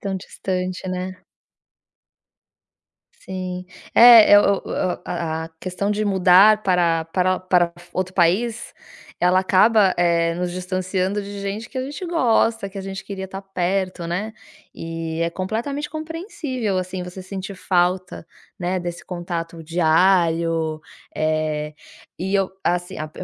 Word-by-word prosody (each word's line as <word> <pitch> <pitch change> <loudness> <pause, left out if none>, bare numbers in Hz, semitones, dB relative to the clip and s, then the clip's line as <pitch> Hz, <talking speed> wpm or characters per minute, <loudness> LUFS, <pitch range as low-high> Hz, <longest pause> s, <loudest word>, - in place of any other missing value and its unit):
Tão 195 -1 -3
distante, 185 -1 -4
né? 185 0 -3 2.0
Sim. 185 -1 -6 0.3
É, 230 -4 +9
o 200 -1 +2
o - - -8 0.3
a 160 -2 -3
a 165 - -9
questão 185 +2 -2
de 210 +1 0
mudar 195 +2 +5
para 170 -3 +2
para 185 +2 +1
para 180 -2 +2 0.2
outro 185 0 -3
país, 220 +7 +1 0.5
ela 180 +1 +4
acaba, 195 +1 +4
eh, 170 -1 +2
nos 180 +1 -2
distanciando 185 +2 -2
de 200 0 -7
gente 200 +3 -4
que - - -12
a 255 - -1
gente 295 +7 -6
gosta, 230 - +1
que 195 - -8
a - - -3
gente 195 0 -7
queria 190 -1 -6
tá 190 +1 -8
perto, 185 -1 -2
né, 195 +6 -3 0.4
E 165 0 -5
é 170 - 0
completamente 235 - -3
compreensível, 310 - -4
assim, 185 0 -4
você 180 +1 -8
sentir 190 +1 -7
falta, 180 -1 0 0.3
né, 185 0 -1
desse 175 -1 -6
contato 170 -2 -5
diário. 165 -1 +2 0.3
Eh, 155 -1 -1 0.4
e 190 +3 -2
eu, 195 -1 +2
assim, 175 0 -1
a 155 0 -5
185 Hz, 135 wpm, -22 LUFS, 175-200 Hz, 2.0 s, É